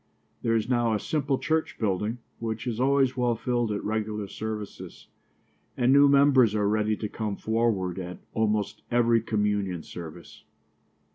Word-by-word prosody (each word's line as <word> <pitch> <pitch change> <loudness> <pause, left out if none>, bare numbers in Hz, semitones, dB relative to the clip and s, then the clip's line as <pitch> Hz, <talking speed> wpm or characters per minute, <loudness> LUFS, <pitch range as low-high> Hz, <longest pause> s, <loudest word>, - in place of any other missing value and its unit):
There 115 - +1
is 110 -1 0
now 120 -3 +2
a - - -1
simple 140 +2 -1
church 160 +2 -1
building, 105 +2 -1 0.2
which 110 0 -4
is 120 -2 -3
always 135 0 +3
well 120 -2 +1
filled 120 -1 -1
at 105 - -3
regular 105 -1 -2
services, 105 0 -7 0.7
and 125 +2 +4
new 140 0 +7
members 140 -6 +5
are 105 -1 +1
ready 105 0 +1
to 105 - -3
come 105 -1 -4
forward 110 -6 0
at 90 -1 -6 0.2
almost 105 -2 0
every 120 -1 +3
communion 105 -5 -1
service. 85 0 -10
110 Hz, 150 wpm, -27 LUFS, 105-120 Hz, 0.7 s, new